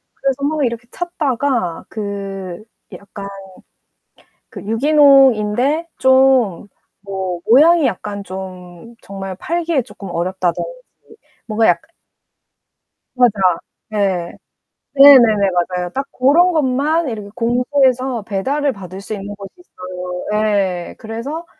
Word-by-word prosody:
그래서 275 0 -2
막 295 0 0
이렇게 235 0 -4
찾다가 270 - -2
그 195 -3 -6 0.3
약간 200 0 -9 1.2
그 - - -10
유기농인데 270 +2 +3
좀 260 -8 +3 0.3
뭐 190 -3 -4
모양이 310 +6 +6
약간 200 +2 -4
좀 185 +2 -9
정말 195 -1 -7
팔기에 335 - -1
조금 195 -4 -11
어렵다든지 180 0 -2 0.8
뭔가 220 0 +1
약간 320 - +1 1.3
맞아. 245 -3 +4 0.6
네. 195 -5 -1 0.6
네, 280 0 +9
네네, 215 -5 +3
맞아요. 180 0 -1
딱 270 +5 -3
고런 310 +8 +3
것만 300 +1 0
이렇게 210 -3 -6
공포해서 250 0 +1
배달을 275 +9 -1
받을 190 -1 -9
수 215 - -6
있는 205 0 -6
곳이 200 -1 -10
있어요. 180 - -8
예예예예. 200 -5 0
그래서 250 +10 -6
225 Hz, 235 characters per minute, -18 LUFS, 195-275 Hz, 1.3 s, 네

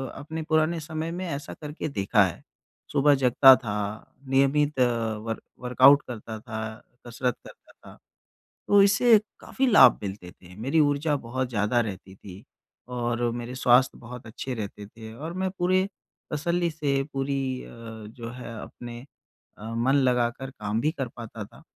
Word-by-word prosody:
अपने 160 +3 -6
पुराने 155 +1 +2
समय 160 +1 -4
में 180 +2 -4
ऐसा 140 -2 -5
करके 150 +1 -5
देखा 105 -4 +3
है। 90 - -6 0.5
सुबह 145 +1 +4
जगता 130 +2 +8
था, 105 -4 -5
नियमित 140 +2 +2
अ, - - +6 0.4
वर्क 115 - -3 0.2
वर्काउट 130 +3 +6
करता 110 -2 -7
था, 110 0 -6 0.3
कसरत 120 +1 -1
करता - - -15
था, - - -16 0.7
तो 205 0 +7
इससे 220 +3 +6 0.2
काफ़ी 270 - -1
लाभ 205 - +7
मिलते 95 -3 -6
थे। 90 0 -17
मेरी 140 +7 +2
ऊर्जा 145 +1 +2
बहुत 130 0 -3
ज़्यादा 115 +1 +1
रहती 95 -4 -5
थी 95 0 -12 0.5
और 120 -1 -1
मेरे 120 +1 -5
स्वास्थ्य 130 0 +3
बहुत 120 0 -10
अच्छे 125 +3 -5
रहते 105 -2 -6
थे 110 +1 -11
और 155 +7 -6
मैं 185 +1 -2
पूरे 185 +2 +2 0.5
तसल्ली 170 +3 0
से 145 -3 0
पूरी 135 0 -1 0.2
अ, - - -12
जो 115 0 -9
है 125 -1 -8
अपने 120 -1 -9 0.6
अ, 105 - -10
मन 120 +4 +2
लगाकर 125 -1 +1
काम 105 -3 -3
भी 150 - +1
कर 135 -6 -4
पाता 115 -2 -7
था। - - -17
125 Hz, 155 wpm, -26 LUFS, 115-150 Hz, 0.7 s, जगता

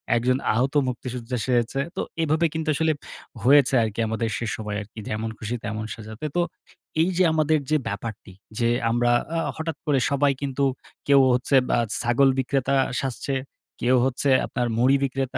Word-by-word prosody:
একজন 125 +2 +2 0.2
আহত 130 +5 +1
মুক্তিযোদ্ধা 125 0 -4
সেজেছে। 125 +1 +1 0.2
তো - - -1 0.2
এভাবে 160 +2 +2
কিন্তু 160 -1 -2
আসলে 160 +2 +2 0.5
হয়েছে 140 +1 +5
আরকি 110 0 -4
আমাদের 110 +1 -1
সে 120 - -3
সময় 105 -1 -5
আরকি 105 +2 -11
যেমন 110 +1 -2
খুশি 110 +2 -3
তেমন 110 +1 -4
সাজাতে। 110 +4 -8
তো 175 - +3 0.6
এই 170 - +3
যে 185 - +5
আমাদের 155 0 +2
যে 155 - +3
ব্যাপারটি, 100 -1 -6 0.3
যে 115 - +2 0.2
আমরা 120 +1 +2 0.3
আ - - +1 0.2
হঠাৎ 160 -2 -4
করে 140 -3 +2
সবাই 140 0 +3
কিন্তু 140 0 -1 0.4
কেউ 140 -1 +6
হচ্ছে 125 +3 +1
বা - - +3 0.2
ছাগল 125 +3 +3
বিক্রেতা 135 +1 0 0.3
সাজছে, 135 +1 -3 0.5
কেউ 125 +2 +3
হচ্ছে 135 +2 0 0.2
আপনার 120 -1 -2
মুড়ি 130 +3 +4
বিক্রেতা, 135 -1 -2
130 Hz, 165 wpm, -24 LUFS, 115-140 Hz, 0.6 s, কেউ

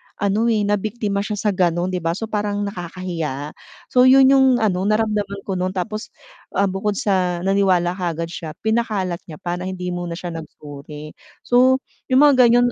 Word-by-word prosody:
ano 205 +3 0
eh, 220 -3 +2
nabiktima 205 0 -1
siya 210 +1 -2
sa 210 0 0
gano'n 180 0 +1
'di 180 - -2
ba, 165 0 0
so 225 - -3
parang 205 -1 -1
nakakahiya, 170 -6 -5 0.4
So 250 0 +6
'yun 265 0 +7
yung 270 -1 +5
ano, 195 -5 0
naramdaman 210 -2 0
ko 195 - -3
noon 185 +1 0
tapos, 215 +4 -4 0.5
ah, 200 - +4
bukod 195 +1 -2
sa 180 -4 0
naniwala 190 -3 +2
kaagad 170 -2 -3
siya, 155 -2 -7
pina-kalat 215 -6 0
niya 155 - -8
pa 175 +2 -4
na 185 - -4
hindi 180 -1 -4
muna 175 -1 -4
siya 175 -2 -6
nagsuri. 150 -1 -9 0.3
So 255 +2 +4 0.3
yung 265 +3 +6
mga 275 -3 +5
ganyan 245 +1 +4
195 Hz, 175 wpm, -21 LUFS, 175-215 Hz, 0.5 s, yun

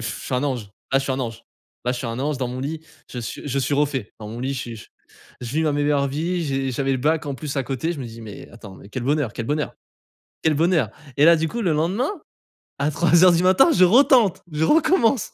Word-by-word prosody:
suis 120 +2 -5
un 125 - 0
ange, 125 -8 -3 0.2
ah 135 - +4
je - - -2
suis 135 -1 -2
un 130 - -2
ange, 115 -1 -5 0.4
là 125 - +1
je 125 - -4
suis 125 - -4
un 115 +1 -4
ange 145 0 -1
dans 125 -2 -2
mon 125 - -5
lit, 155 +4 -4 0.3
je 125 - -6
suis 115 - -6
je 140 -1 -1
suis 135 +2 0
refait. 140 -6 -1
Dans 105 -1 -8
mon 115 +2 -7
lit, 135 +2 -2
je 125 - -3
suis 115 -3 -8 0.6
je 120 - -5
vis 160 - +2
ma 155 - +1
meilleure 145 -1 +1
vie, 170 +5 -2
j'ai 135 -2 -1
j'avais 135 +2 0
le 130 - 0
bac 150 +3 0
en 140 - -3
plus 145 +1 -5
à 135 - +1
côté 135 +7 -2
je 150 - -7
me 125 - -5
dis: 115 0 -10
«Mais 105 -3 -10
attends, 105 -5 -12
mais - - -14
quel 120 +4 -5
bonheur, 140 -3 0
quel 115 - -4
bonheur, 150 +5 -2 0.7
quel 160 -1 +3
bonheur» 160 - +2 0.3
et 145 - +5
là, 170 +1 +8
du 160 0 0
coup, 235 +9 -4
le 175 -7 +1
lendemain, 185 - 0 0.7
à 140 - +1
3:00 170 +3 +5
du 170 +1 +2
matin, 190 - +5
je - - +6
retente, 230 -1 +5
je 150 +1 -1
recommence. 300 - +3
140 Hz, 255 wpm, -22 LUFS, 125-165 Hz, 0.7 s, là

